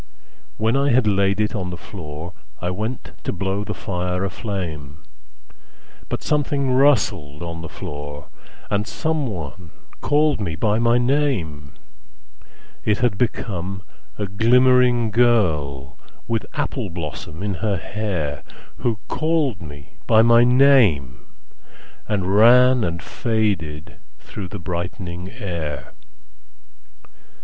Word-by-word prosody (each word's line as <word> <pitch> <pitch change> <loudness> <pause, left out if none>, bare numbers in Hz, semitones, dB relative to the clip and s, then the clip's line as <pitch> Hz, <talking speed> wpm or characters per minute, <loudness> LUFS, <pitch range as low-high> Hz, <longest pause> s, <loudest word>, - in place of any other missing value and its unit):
When 110 +3 +1
I 140 +1 +2
had 125 -2 +4
laid 100 -1 +2
it 105 0 +1
on 95 -5 -3
the 90 - -6
floorI 85 0 -8
went 110 +7 -4
to - - -2
blow 95 +1 -2
the 105 0 -5
fire 90 0 -2
a 100 - -3
flame, 80 - -5 1.1
But - - -3
something 145 -2 0
rustled 100 - +2
on 85 -1 -5
the 80 - -7
floor, 75 -1 -7 0.4
And 105 +2 0
someone 100 - -3 0.3
called 150 -4 +2
me 85 -5 -2
by 105 +7 +1
my 120 0 +4
name:It 105 - -3
had 120 -3 +1
become 95 -5 -2 0.3
a 105 - -2
glimmering 120 +2 +4
girlWith 85 - 0
apple - - -2
blossom 80 +1 -6
in 100 -1 -1
her 105 -3 +1
hairWho 90 - -4
called 155 - 0
me 75 -3 -11
by 110 0 +6
my 115 0 +6
name 120 - +4 0.8
and 105 -3 0
ranAnd 110 -2 +5
faded 85 -9 -2 0.2
through 100 -3 -7
the 100 - -7
brightening 90 0 -5
air. 85 - -5
100 Hz, 110 wpm, -22 LUFS, 85-120 Hz, 1.1 s, by